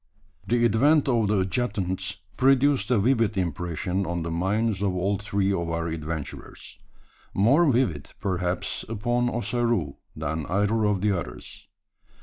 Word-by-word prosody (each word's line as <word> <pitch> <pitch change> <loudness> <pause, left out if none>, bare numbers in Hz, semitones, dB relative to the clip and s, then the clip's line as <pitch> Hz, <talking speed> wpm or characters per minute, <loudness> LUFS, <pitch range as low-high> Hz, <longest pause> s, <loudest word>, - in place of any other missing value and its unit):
The 120 0 +3
advent 140 +8 +4
of 115 -5 +2
the 100 -1 +2
adjutants 95 -3 -1 0.2
produced 135 -4 +3
a 125 - +3
vivid 115 -1 +2
impression 90 +2 -2
on 85 -1 -2
the 85 - -4
minds 100 +4 0
of 95 -2 0
all 95 +2 0
three 100 -1 0
of 85 -3 -2
our 85 0 -2
adventurers 80 -2 -6 0.6
more 140 - +4
vivid, 115 - 0
perhaps, 90 -1 -2
upon 120 +3 0
Ossaroo 115 - -1 0.2
than 80 +1 -3
either 105 +3 +1
of 105 -3 +1
the 105 0 +2
others. 60 -8 -6
100 Hz, 135 wpm, -26 LUFS, 90-120 Hz, 0.6 s, advent